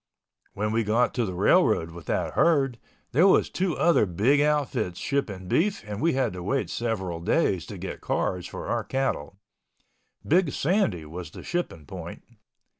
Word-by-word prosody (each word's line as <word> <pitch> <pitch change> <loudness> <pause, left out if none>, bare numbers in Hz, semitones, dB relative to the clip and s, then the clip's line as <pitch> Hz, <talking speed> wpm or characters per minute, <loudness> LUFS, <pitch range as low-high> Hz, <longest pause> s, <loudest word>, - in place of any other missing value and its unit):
When 105 +2 -1
we 115 +1 +1
got 115 +4 +2
to 120 -2 0
the 95 - -4
railroad 80 -1 +3
with 85 -2 -11
that - - -1
herd, 135 -8 +2 0.3
there 165 +9 +5
was 190 - +4
two 180 -3 -1
other 170 -11 +4
big 115 +12 +3
outfits 140 -11 0
shipping 105 -10 -2
beef 195 - +1
and 105 +1 -5
we 165 - +3
had 130 -5 0
to 90 - -6
wait 130 +9 -1
several 95 -8 -2
days 85 - +1
to - - -7
get - - -6
cars 90 -1 -1
for - - -7
our - - -1
cattle. 130 - -2 0.9
Big 170 -2 +3
Sandy 145 - +1
was 85 +1 -7
the - - -11
shipping 170 - -3
point. - - -8
115 Hz, 170 wpm, -26 LUFS, 90-145 Hz, 0.9 s, there